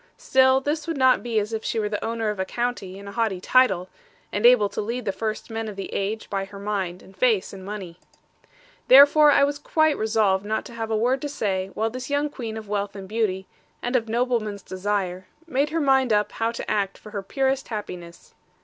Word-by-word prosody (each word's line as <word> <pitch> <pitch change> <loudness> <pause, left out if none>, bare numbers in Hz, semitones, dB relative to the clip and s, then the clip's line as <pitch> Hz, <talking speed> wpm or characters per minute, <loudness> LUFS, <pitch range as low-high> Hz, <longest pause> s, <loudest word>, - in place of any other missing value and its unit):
Still 265 - +4
this 295 +3 -2
would 330 -3 -2
not 260 -1 +4
be 235 -2 -2
as 210 +1 0
if 220 - -3
she - - -2
were 215 -1 0
the 210 0 -3
owner 225 -1 -1
of 210 - -7
a - - +1
county, 235 -3 -3
and 200 0 -10
a - - -6
haughty 215 -4 -1
title; 190 -4 +3 0.4
and 210 +4 +4
able 240 -4 +6
to - - -4
lead 235 +4 -4
the 195 - +1
first 215 +4 -4
men 225 0 -3
of 210 - -6
the 195 - -6
age, 210 +3 -2
by 195 0 -2
her 200 +1 -12
mind, 195 -3 -3
and 190 - -17
face, 215 -2 +1
and 190 -1 -9
money. 190 -4 -7 0.9
Therefore 285 +3 +8 0.2
was 290 +1 -3
I - - -29
quite 315 -2 +2
resolved 215 -3 +2
not 215 +1 -2
to 240 - -10
have 225 -1 -4
a 220 - +1
word 250 +4 +1
to 290 - -3
say, 195 -8 -2
while 225 +1 0
this 255 +3 -6
young 285 +1 0
queen 225 -6 -6
of 220 -1 -8
wealth 200 0 -2
and 195 -1 -8
beauty, 200 -3 -1 0.4
and 245 +2 -1
of 230 -3 +1
noblemen's 225 -4 -1
desire, 185 -1 -3 0.2
made 290 -2 0
her 330 +2 -1
mind 265 -4 +3
up 210 0 +2
how 225 0 -1
to - - -5
act 200 -2 -1
for 210 - -13
her 205 -2 -3
purest 270 +6 -1
happiness. 180 -6 -8
220 Hz, 225 wpm, -24 LUFS, 200-255 Hz, 0.9 s, Therefore